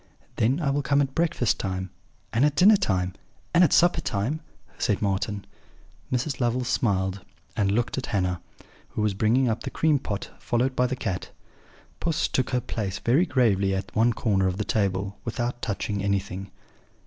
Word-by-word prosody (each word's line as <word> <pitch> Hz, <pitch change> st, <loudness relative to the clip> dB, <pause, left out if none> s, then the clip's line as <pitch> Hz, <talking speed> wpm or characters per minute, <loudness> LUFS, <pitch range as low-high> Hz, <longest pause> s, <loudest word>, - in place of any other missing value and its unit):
"'Then 130 Hz, +8 st, +2 dB
I 145 Hz, -5 st, +1 dB
will 145 Hz, +1 st, +1 dB
come 140 Hz, +1 st, +2 dB
at 135 Hz, -2 st, 0 dB
breakfast 165 Hz, -8 st, +1 dB
time, 95 Hz, -1 st, -3 dB, 0.4 s
and 115 Hz, +4 st, +3 dB
at 150 Hz, 0 st, +3 dB
dinner 205 Hz, +6 st, +7 dB
time, 95 Hz, -, 0 dB, 0.4 s
and 175 Hz, +1 st, +6 dB
at 165 Hz, -, +4 dB
supper 175 Hz, -1 st, +4 dB
time,' 120 Hz, +9 st, -2 dB, 0.4 s
said 105 Hz, -5 st, +1 dB
Marten. 100 Hz, 0 st, -1 dB, 0.7 s
"Mrs. 130 Hz, +2 st, -1 dB
Lovel 120 Hz, +1 st, +1 dB
smiled 95 Hz, -6 st, 0 dB, 0.3 s
and 100 Hz, -2 st, +1 dB
looked 120 Hz, +5 st, 0 dB
at 130 Hz, -, -5 dB
Hannah, 90 Hz, -5 st, -1 dB, 0.5 s
who 105 Hz, -, -2 dB
was 105 Hz, -2 st, +1 dB
bringing 115 Hz, +6 st, +2 dB
up 110 Hz, -1 st, -1 dB
the -, -, -4 dB
cream 155 Hz, -3 st, +2 dB
pot, 100 Hz, -6 st, -5 dB
followed 125 Hz, +2 st, 0 dB
by 125 Hz, -, +3 dB
the 130 Hz, -, -2 dB
cat. 95 Hz, -7 st, -3 dB, 0.7 s
Puss 165 Hz, -2 st, 0 dB
took 130 Hz, -, 0 dB
her 125 Hz, -1 st, 0 dB
place 100 Hz, -4 st, -3 dB
very 145 Hz, +10 st, +2 dB
gravely 100 Hz, -8 st, +2 dB
at 95 Hz, 0 st, -5 dB
one 115 Hz, +2 st, +4 dB
corner 100 Hz, -4 st, +1 dB
of 90 Hz, 0 st, -1 dB
the 105 Hz, -, -2 dB
table, 100 Hz, -1 st, -1 dB
without 120 Hz, +1 st, -3 dB
touching 100 Hz, -1 st, -2 dB
anything. 100 Hz, -1 st, -2 dB
115 Hz, 175 wpm, -26 LUFS, 100-130 Hz, 0.7 s, dinner